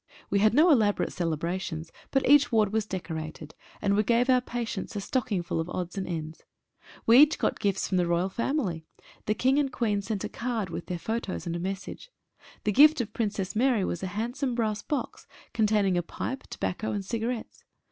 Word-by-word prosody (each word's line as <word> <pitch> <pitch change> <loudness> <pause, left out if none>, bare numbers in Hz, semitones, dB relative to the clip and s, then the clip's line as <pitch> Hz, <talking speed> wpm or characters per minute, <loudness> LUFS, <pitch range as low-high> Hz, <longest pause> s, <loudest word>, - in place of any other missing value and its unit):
We 200 - +3
had 215 +2 +4
no 325 +4 +6
elaborate 215 -7 +2
celebrations, 165 0 -3 0.2
but 270 - +1
each 290 0 +6
ward 215 -3 +2
was 220 -1 0
deco 180 -4 -4
rated, 155 -1 -7 0.3
and 200 0 +3
we 210 - +4
gave 240 +4 +3
our 255 -1 +4
patients 235 -4 -4
a - - -1
stocking 205 -3 -1
full 170 - -2
of 160 +2 -3
odds 180 -1 -4
and 195 -1 -3
ends. 160 -2 -5 0.6
We 235 +3 +7
each 300 +1 +6
got - - -1
gifts 195 -2 0
from 185 - 0
the 175 -1 +2
Royal 170 +2 +1
family. 195 - -2 0.4
The 215 - +2
King 265 +5 +3
and 275 -2 0
Queen 210 -5 0
sent 200 0 -3
a - - -1
card 230 -6 -3
with 170 - -6
their 180 - -3
photos 220 +1 -3
and 170 -1 -3
a - - -3
message. 190 - -5 0.5
The 210 - +1
gift 300 +7 +7
of 230 -3 -1
the - - -36
Princess 205 -3 -2
Mary 235 -4 +2
was 175 - -3
a 190 - -2
hand 220 +7 -3
some 270 -4 -1
brass 215 -3 -1
box 295 - -4 0.3
containing 210 -4 +2
a - - 0
pipe, 260 +9 -5
tobacco, 210 +4 -3
and 200 -2 -3
cigarettes. 230 +2 -4
210 Hz, 210 wpm, -28 LUFS, 180-240 Hz, 0.6 s, We